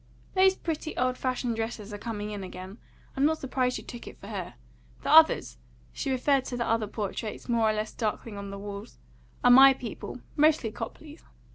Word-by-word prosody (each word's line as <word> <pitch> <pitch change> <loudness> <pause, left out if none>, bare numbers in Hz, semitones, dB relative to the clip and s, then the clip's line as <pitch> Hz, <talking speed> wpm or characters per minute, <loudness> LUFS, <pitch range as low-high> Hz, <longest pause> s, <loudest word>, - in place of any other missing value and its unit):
"Those 380 0 +5
pretty 320 -2 -4
old 255 0 +1
fashioned 255 -2 -1
dresses 225 -2 -4
are - - -4
coming 210 -2 -4
in 205 -2 -5
again. 185 +3 -9 0.4
I'm 270 - 0
not 315 +2 +3
surprised 255 -2 -1
you - - -8
took 240 - -9
it - - -10
for - - -10
her. - - -5 0.5
The - - 0
others" 320 0 +6 0.3
she 275 - -3
referred 265 +1 +2
to 245 - -4
the 240 - -1
other 225 -1 +1
portraits 210 +1 -5
more 230 -2 +3
or - - +2
less 215 0 -3
darkling 220 -1 -3
on 200 0 -6
the 200 - -6
walls 205 +2 -8 0.5
"are 245 - +7
my 270 +2 +9
people; 245 0 -7
mostly 300 -6 +3
Copleys." 295 +8 -8
240 Hz, 190 wpm, -28 LUFS, 210-270 Hz, 0.5 s, my